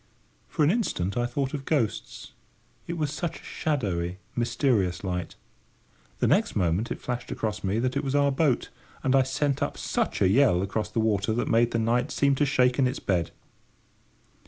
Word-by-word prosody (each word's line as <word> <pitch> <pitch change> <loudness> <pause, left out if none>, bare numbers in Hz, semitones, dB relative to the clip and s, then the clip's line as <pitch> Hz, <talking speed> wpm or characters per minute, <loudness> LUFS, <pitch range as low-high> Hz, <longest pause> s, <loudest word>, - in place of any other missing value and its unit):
For 155 - 0
an 145 - +5
instant 100 - -1
I 120 0 +1
thought 135 +2 -2
of 140 -2 -4
ghosts: 135 -8 -2 0.6
it 170 - -3
was 150 -3 -1
such 165 +1 -3
a - - -18
shadowy, 95 - -2 0.2
mysterious 115 -7 +1
light. 90 -2 -3 0.8
The - - +1
next - - +2
moment 90 +4 +1
it - - -3
flashed 125 0 -4
across 105 -2 -3
me 100 +2 0
that 125 +3 0
it 140 - 0
was 135 0 -1
our 140 -1 +4
boat, 135 -2 +1 0.3
and 135 0 +3
I 135 - +6
sent 135 +1 0
up - - -1
such - - -1
a - - +4
yell 100 -4 +4
across 105 +2 -2
the 115 - -2
water 110 -1 +1
that 120 - -1
made 115 +1 +3
the 115 - -1
night 120 +4 +1
seem 140 -1 +2
to 145 - +2
shake 125 -1 +2
in 130 - +4
its 125 - -3
bed. 90 -3 0
120 Hz, 190 wpm, -27 LUFS, 100-140 Hz, 0.8 s, I